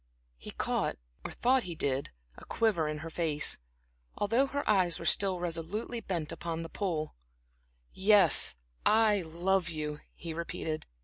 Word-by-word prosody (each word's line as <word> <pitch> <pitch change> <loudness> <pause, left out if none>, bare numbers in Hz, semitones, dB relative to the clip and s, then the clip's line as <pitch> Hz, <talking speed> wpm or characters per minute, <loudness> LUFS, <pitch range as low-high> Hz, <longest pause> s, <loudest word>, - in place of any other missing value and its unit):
He - - -10
caught, - - -2 0.3
or - - -6
thought 260 +2 +2
he 175 -6 -7
did, 140 -2 -1 0.3
a - - -14
quiver 205 -9 0
in 150 0 -3
her 165 - -7
face, 155 -3 +2 0.6
although 230 +7 +2
her 285 +1 -4
eyes 185 -5 +3
were 170 - -8
still 190 0 +3
resolutely 175 +8 -3
bent 170 -6 -3
upon 165 0 -4
the 165 - -8
pool. 165 -6 -3 0.8
"Yes, 205 +1 +6 0.3
I 215 -2 +4
love 175 +2 0
you," 150 -2 -4 0.2
he 165 -1 -7
repeated. 160 -1 -4
170 Hz, 145 wpm, -30 LUFS, 160-205 Hz, 0.8 s, Yes